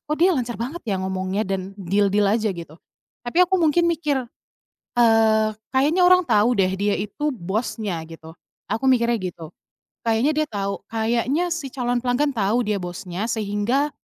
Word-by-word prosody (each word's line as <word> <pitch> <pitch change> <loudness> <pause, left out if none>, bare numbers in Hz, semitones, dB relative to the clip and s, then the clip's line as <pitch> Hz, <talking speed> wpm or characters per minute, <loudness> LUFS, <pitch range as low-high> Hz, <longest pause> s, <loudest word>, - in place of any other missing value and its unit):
oh, - - -1
dia 350 0 +3
lancar 240 -2 -3
banget 275 +8 -5
ya 195 -4 -1
ngomongnya 190 +2 -2
dan 190 0 -3
deal-deal 200 +2 +2
aja," 215 -1 +1
gitu, 165 -3 -10 0.5
tapi 285 +9 +1
aku 370 +1 +4
mungkin 340 0 +3
mikir, 305 -5 0 0.8
eee, 220 -2 +4 0.2
"Kayaknya 300 +7 +3
orang 365 -1 +5
tahu 210 +3 +4
deh 185 - +4
dia 200 +1 0
itu 290 +9 -2
bosnya." 200 -3 -3
Gitu, 160 0 -12 0.3
aku 220 +6 -3
mikirnya 235 -1 +2 0.2
gitu. 165 -2 -10 0.6
Kayaknya 230 +7 +3
dia 310 0 0
tahu, 200 -5 -3
kayaknya 235 +8 0
si 335 -5 -3
calon 245 -2 -1
pelanggan 255 +4 +1
tahu 225 +1 +1
dia 210 -2 -1
bosnya 180 +3 -5
sehingga 220 +7 0
225 Hz, 160 wpm, -22 LUFS, 200-275 Hz, 0.8 s, orang